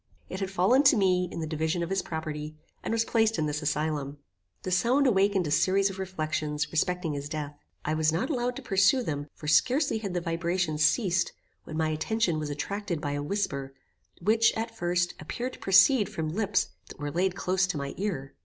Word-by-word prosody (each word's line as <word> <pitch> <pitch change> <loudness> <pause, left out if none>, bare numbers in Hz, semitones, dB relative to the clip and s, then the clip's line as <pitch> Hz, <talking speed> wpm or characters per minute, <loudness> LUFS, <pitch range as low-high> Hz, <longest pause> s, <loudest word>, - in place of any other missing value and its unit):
It 185 - -5
had 195 -1 -2
fallen 195 +8 +4
to 270 -2 +7
me, 180 -3 +2
in 170 - -5
the - - -2
division 160 +2 -1
of 170 - -5
his 195 - +1
property, 155 -1 -5 0.3
and - - -3
was 225 0 +1
placed 225 -1 +2
in 155 - 0
this 150 0 -2
asylum. 150 -1 -2 0.5
The 185 - -3
sound 240 +10 +3
awakened 200 -5 +3
a 150 - -3
series 190 +5 +3
of 190 - -9
reflections, 155 -5 -2
respecting 175 0 0
his 145 0 -5
death. 150 -1 -4 0.3
I 155 - 0
was 155 0 +2
not 165 - -1
allowed 250 -2 -1
to - - -8
pursue 200 +7 +3
them; 145 -6 -3
for 150 - -9
scarcely 255 - +3
had 200 -4 -4
the - - +2
vibrations 170 -2 -1
ceased, 180 +1 +2 0.3
when 155 - -6
my 160 -1 +1
attention 170 +2 0
was 150 -1 -3
attracted 175 +4 -3
by 145 -2 -3
a 145 0 -2
whisper, 140 -6 -3 0.4
which, 220 +5 +4
at 225 0 -4
first, 175 -3 0
appeared 245 +11 -4
to - - -12
proceed 195 +3 +5
from 160 -7 -3
lips 200 +4 0 0.2
that - - -11
were 145 0 -4
laid 180 +3 0
close 185 -1 +1
to 180 - -2
my 140 -1 -4
ear. 175 -10 -3
175 Hz, 205 wpm, -28 LUFS, 155-200 Hz, 0.5 s, to